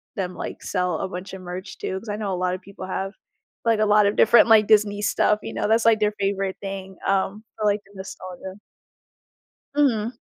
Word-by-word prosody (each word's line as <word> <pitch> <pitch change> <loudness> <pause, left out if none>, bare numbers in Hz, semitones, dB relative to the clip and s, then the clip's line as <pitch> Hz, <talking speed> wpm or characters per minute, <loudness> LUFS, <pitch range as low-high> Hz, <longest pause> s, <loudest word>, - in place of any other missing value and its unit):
them, 185 -3 -3
like, - - -6
sell 180 -3 -1
a - - -2
bunch 180 +1 -7
of 190 - -9
merch 180 +2 -7
too, 190 - -3
'cause 225 - -11
I 205 - -1
know 205 -3 -3
a - - 0
lot 180 0 +1
of 185 - -10
people 190 -1 -9
have 195 +1 -3 0.5
like, 225 -2 +3
a - - +4
lot 210 0 +5
of 205 - 0
different, 235 +2 +6
like, 220 -2 +6
Disney 210 -1 +3
stuff, 210 0 +2
you - - -5
know, - - -1
that's, 225 +1 +3
like, 225 -1 +5
their 210 0 +1
favorite 195 -1 -1
thing, 195 -1 -6
um, 195 +2 0
for, 215 - -2
like, 205 +1 +2
the 200 - -21
nostalgia. 185 -1 -8 1.2
Mhm. 240 -5 +1
200 Hz, 215 wpm, -23 LUFS, 190-215 Hz, 1.2 s, different